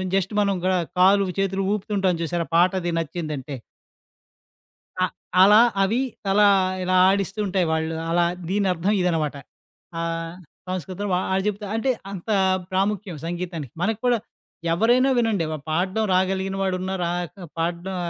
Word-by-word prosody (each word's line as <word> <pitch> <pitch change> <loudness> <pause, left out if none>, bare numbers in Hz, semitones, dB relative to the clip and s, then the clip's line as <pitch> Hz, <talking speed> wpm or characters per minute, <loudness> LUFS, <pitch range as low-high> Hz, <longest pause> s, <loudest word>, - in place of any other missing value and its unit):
Just 195 +1 0
మనం 200 -1 +1
గన 185 - +2 0.3
కాలు, 195 +2 +5
చేతులు 195 0 0
ఊపుతుంటాం 200 -3 0
చూసారా 170 +1 -2
పాట 175 +2 +5
అది 175 0 -2
నచ్చిందంటే. 155 -4 -4 1.5
అ - - +5 0.4
అలా 210 +3 +8 0.2
అవి 220 +6 +1 0.3
తలా 205 +1 +5 0.3
ఇలా 185 0 +1
ఆడిస్తూ 195 +1 0
ఉంటాయి. 190 -2 +1
వాళ్ళు 160 0 -1 0.2
అలా 175 +1 +3 0.2
దీనర్థం 190 -1 +1
ఇదనమాట. 160 -5 0 0.6
ఆహ్, 165 0 -3 0.3
సంస్కృతంలో. 185 +3 -4
వాడు 190 +1 0
చెప్తా 210 0 -2
అంటే 225 +4 0 0.2
అంత 195 0 -8 0.4
ప్రాముఖ్యం 195 -1 -1
సంగీతానికి 170 -6 -5
మనకు 220 +3 0
కూడా 245 -1 +3 0.5
ఎవరైనా 240 +9 +3
వినండి 225 -7 +1 0.3
పాడడం 185 +7 0
రాగలిగిన 190 +1 0
వాడు 190 -1 0
ఉన్న 190 +1 -3
రాక 175 -1 -2 0.3
పాడడం 170 +3 -2
185 Hz, 130 wpm, -23 LUFS, 170-200 Hz, 1.5 s, అలా